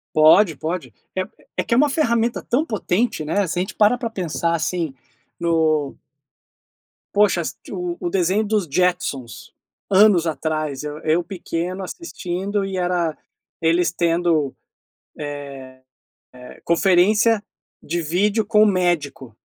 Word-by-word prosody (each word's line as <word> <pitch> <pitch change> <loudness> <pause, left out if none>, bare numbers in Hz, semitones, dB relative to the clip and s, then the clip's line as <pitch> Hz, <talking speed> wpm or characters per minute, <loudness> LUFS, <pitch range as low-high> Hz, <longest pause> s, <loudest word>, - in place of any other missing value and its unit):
Pode, 160 +3 +6
pode. 165 +4 -4 0.2
É 190 - +1 0.4
é - - +2
que - - -1
é - - +4
uma 295 +2 +4
ferramenta 235 -5 +1
tão 250 +5 +2
potente, 215 - -1
né, 200 +6 +1
se 170 - -2
a - - +2
gente 190 - -4
para 215 +3 +4
pra 235 -1 -3
pensar, 170 -4 -2
assim, 165 -2 -2 0.5
no 160 -4 +1 1.2
Poxa, 205 -4 +3
assisti 160 - -7
o 180 -2 -4
o 175 - -2
desenho 190 +3 +1
dos 210 -2 0
Jetsons, 140 -8 -1 0.4
anos 195 -4 +5
atrás, 155 -3 -2
eu 150 0 -5
eu 160 +2 +1
pequeno 180 0 -4
assistindo 195 - -4
e 195 -1 -4
era 175 -3 0 0.4
eles 170 +2 +2
tendo, 170 -4 +1 1.9
eh 125 0 -12
eh, - - -22
conferência 200 +5 +3 0.4
de 170 +3 -2
vídeo 200 +7 +1
com 215 0 +4
um - - +6
médico. 175 - 0
180 Hz, 135 wpm, -21 LUFS, 160-205 Hz, 1.9 s, Pode